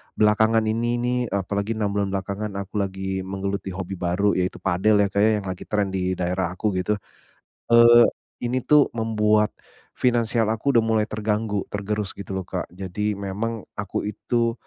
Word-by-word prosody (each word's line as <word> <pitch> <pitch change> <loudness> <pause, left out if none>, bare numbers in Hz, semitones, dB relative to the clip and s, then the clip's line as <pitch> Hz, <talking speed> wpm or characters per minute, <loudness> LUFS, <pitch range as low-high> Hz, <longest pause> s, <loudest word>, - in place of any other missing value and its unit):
belakangan 110 +1 +3
ini 120 +2 0
nih, 125 +1 0
apalagi 100 +2 -1
6 105 -2 0
bulan 100 -1 0
belakangan 100 +2 -3
aku 100 +1 -8
lagi 95 0 -3
menggeluti 95 0 -3
hobi 95 +1 -5
baru 95 +3 +1
yaitu 90 +1 -1
padel 95 +3 +2
ya - - +2
Kak 100 - +1
ya, 110 - +5
yang 95 - -8
lagi 90 - -5
tren 105 -1 +1
di 95 -1 0
daerah 90 0 -1
aku 105 +3 0
gitu. 105 +3 0 0.8
Eee, 120 0 +8 0.4
ini 125 +2 0
tuh 150 -1 +5
membuat 105 -2 +2 0.4
finansial 115 -2 +2
aku 115 +5 0
udah 115 - +6
mulai 110 -1 +2
terganggu, 105 -1 -1
tergerus 105 0 -2
gitu 100 -1 -7
loh 95 - -3
Kak. - - -3
Jadi, 95 +3 -3
memang 105 +3 -4
aku 100 -1 -3
itu, 115 +2 0
105 Hz, 170 wpm, -24 LUFS, 95-110 Hz, 0.8 s, Eee